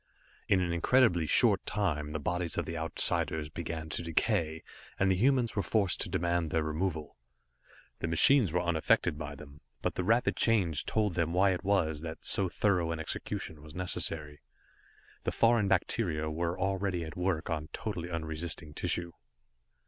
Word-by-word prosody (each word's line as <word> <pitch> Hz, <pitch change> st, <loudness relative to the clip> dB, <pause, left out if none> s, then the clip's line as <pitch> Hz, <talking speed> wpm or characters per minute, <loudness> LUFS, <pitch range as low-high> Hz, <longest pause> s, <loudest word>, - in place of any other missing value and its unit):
In 95 Hz, -2 st, +3 dB
an 85 Hz, -2 st, -1 dB
incredibly 90 Hz, -2 st, +3 dB
short -, -, +4 dB
time 75 Hz, -8 st, -1 dB
the 80 Hz, -, -2 dB
bodies 90 Hz, +3 st, -2 dB
of -, -, 0 dB
the 85 Hz, -, -5 dB
Outsiders 80 Hz, -1 st, -1 dB
began 80 Hz, 0 st, -5 dB
to 80 Hz, -, -3 dB
decay, 80 Hz, -1 st, 0 dB, 0.3 s
and 95 Hz, 0 st, +3 dB
the -, -, +3 dB
humans 125 Hz, +3 st, +2 dB
were 100 Hz, -, +1 dB
forced 100 Hz, -3 st, +1 dB
to -, -, -2 dB
demand 85 Hz, -1 st, 0 dB
their 80 Hz, 0 st, +1 dB
removal. 80 Hz, 0 st, -3 dB, 0.8 s
The -, -, -2 dB
machines 105 Hz, -, +5 dB
were 90 Hz, +2 st, +1 dB
unaffected 80 Hz, -3 st, +2 dB
by 75 Hz, -2 st, -5 dB
them, 70 Hz, +1 st, -13 dB, 0.2 s
but -, -, 0 dB
the 90 Hz, -, -2 dB
rapid 115 Hz, +6 st, +2 dB
change 95 Hz, -, +1 dB
told 105 Hz, -4 st, +1 dB
them 85 Hz, -1 st, 0 dB
why 95 Hz, +2 st, +4 dB
it 90 Hz, -, -3 dB
was 80 Hz, -7 st, +1 dB
that 80 Hz, -1 st, -7 dB
so 95 Hz, -2 st, +2 dB
thorough 90 Hz, -4 st, +1 dB
an 80 Hz, -, -3 dB
execution 80 Hz, -1 st, -4 dB
was 75 Hz, 0 st, -12 dB
necessary. 75 Hz, -4 st, -2 dB, 0.8 s
The -, -, -1 dB
foreign 115 Hz, -3 st, +3 dB
bacteria 85 Hz, -5 st, 0 dB
were 85 Hz, +3 st, -2 dB
already 95 Hz, -2 st, -1 dB
at 80 Hz, -, -8 dB
work 90 Hz, -2 st, -1 dB
on 75 Hz, -1 st, -3 dB
totally 90 Hz, -6 st, -4 dB
unresisting 80 Hz, -1 st, -4 dB
tissue. 85 Hz, +2 st, -1 dB
85 Hz, 165 wpm, -31 LUFS, 80-95 Hz, 0.8 s, machines